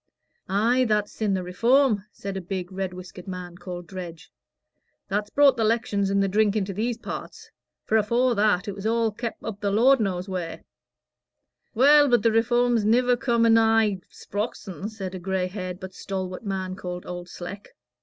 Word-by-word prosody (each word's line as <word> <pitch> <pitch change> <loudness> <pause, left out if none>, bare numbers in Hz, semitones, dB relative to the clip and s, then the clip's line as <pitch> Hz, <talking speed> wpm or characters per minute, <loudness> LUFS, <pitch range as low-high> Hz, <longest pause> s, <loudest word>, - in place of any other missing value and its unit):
"Ay, 230 +6 +3
that's 210 -2 +1
sin' 210 -3 -1
the 185 - -2
Reform," 230 +4 +2
said 195 -1 -6
a 190 - -3
big, 180 0 -5
red 190 -1 -3
whiskered 180 +1 -10
man, 180 -2 -6
called 175 -1 -7
Dredge. 175 0 -9 0.8
"That's 205 +1 -1
brought 280 +1 +5
the 225 - +1
'lections 215 -3 +1
and 200 0 +2
the - - +1
drink 210 +1 +2
into 195 -2 -1
these 225 +4 -1
parts; - - -8 0.3
for 220 - +3
afore 235 +4 +2
that, 205 -2 +2
it 205 - -3
was 200 +2 -4
all 230 0 +1
kep' 235 +2 -5
up 210 -3 -6
the 200 - 0
Lord 245 +7 +5
knows 185 -3 -1
wheer." 180 -3 -5 1.1
"Well, 290 +4 +6
but 240 -4 +3
the 230 - +4
Reform's 240 0 +2
niver 245 +3 +3
come 235 -1 +1
anigh 225 -3 +4
Sprox'on," 205 -2 -5
said 195 -4 -6
a 185 - -5
gray 190 0 -1
haired 185 -1 -5
but 190 -1 -8
stalwart 185 -1 -5
man 190 -2 -3
called 180 -2 -6
Old 175 0 -6
Sleck. 185 +3 -8
205 Hz, 175 wpm, -25 LUFS, 185-225 Hz, 1.1 s, Well